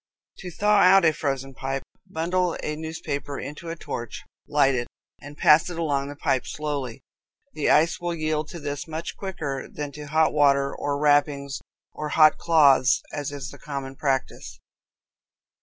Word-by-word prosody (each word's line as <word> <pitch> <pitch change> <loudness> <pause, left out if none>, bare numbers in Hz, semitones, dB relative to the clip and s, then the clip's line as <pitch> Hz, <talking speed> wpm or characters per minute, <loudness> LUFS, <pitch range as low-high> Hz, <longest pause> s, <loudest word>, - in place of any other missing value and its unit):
To 185 - -7
thaw 210 +4 +2
out 190 -1 +6
a 160 - +5
frozen 135 -3 -3
pipe, 135 +1 -4 0.3
bundle 175 +1 0
a 150 - -2
newspaper 155 -3 -5
into 150 +5 -7
a 165 - -4
torch, 120 -8 -6 0.2
light 145 -2 +3
it, 120 -1 -2 0.3
and 145 +1 -11
pass 155 +3 +5
it 175 - -6
along 140 -4 -1
the 145 - -7
pipe 130 -2 0
slowly. 140 -5 -4 0.5
The 150 - 0
ice 160 +3 +4
will 175 -1 -2
yield 155 -1 -1
to 170 - -8
this 145 0 -5
much 160 +1 -5
quicker 150 -9 -5
than 145 -1 -5
to 150 +1 -9
hot 155 +2 +2
water 140 -1 +3
or 145 0 -2
wrappings 145 -1 +1 0.3
or 150 0 -5
hot 155 0 +5
cloths, 140 -6 +4
as 145 -2 -3
is 140 -2 -6
the - - -13
common 135 -2 -6
practice. 130 - -2
145 Hz, 165 wpm, -25 LUFS, 140-160 Hz, 0.5 s, out